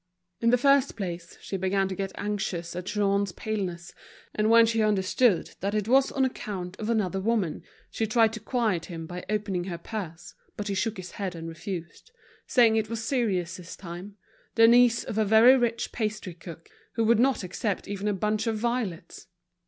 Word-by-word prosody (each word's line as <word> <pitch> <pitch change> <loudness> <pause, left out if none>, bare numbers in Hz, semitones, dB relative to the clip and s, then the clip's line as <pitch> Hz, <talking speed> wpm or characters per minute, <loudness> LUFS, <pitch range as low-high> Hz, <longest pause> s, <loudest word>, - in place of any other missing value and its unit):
In 230 - +2
the 245 - +5
first 275 +1 +3
place, 175 -5 -6
she 195 - -4
began 190 +1 +1
to 190 - -4
get 195 0 -3
anxious 190 -5 -3
at 180 +1 -5
Jean's 200 -2 +1
paleness, 185 -5 -4 0.4
and 215 0 +1
when 230 0 +7
she 225 0 +1
understood 210 0 +2
that 200 +3 -2
it 210 -1 -1
was 265 +3 +4
on 265 -1 +2
account 190 -7 -5
of 215 0 -3
another 195 -4 0
woman, 205 -6 0 0.3
she 220 - -1
tried 225 0 +3
to 220 - -5
quiet 220 -7 -1
him 165 -2 -7
by 180 +2 -7
opening 200 -4 -1
her 175 -3 -4
purse, 170 -3 -7 0.2
but 210 0 -4
he - - 0
shook 210 +3 -1
his 185 -1 -8
head 195 -3 -4
and 165 0 -7
refused, 170 - -7 0.4
saying 230 -3 +4
it 215 -1 -1
was 225 -1 -3
serious 195 -9 -1
this 180 -1 -9
time, 180 +3 -9 0.4
the 225 0 +7
niece 240 0 +5
of 220 - -3
a - - +4
very 220 +5 +7
rich 240 -2 0
pastry 215 -5 -3
cook, 165 -1 -11 0.3
who 230 - 0
would 225 0 +4
not 260 -3 +2
accept 190 +2 -3
even 200 0 -3
a 210 - +2
bunch 215 +3 -1
of 225 -1 0
violets. 225 -8 -3
210 Hz, 190 wpm, -27 LUFS, 185-225 Hz, 0.4 s, when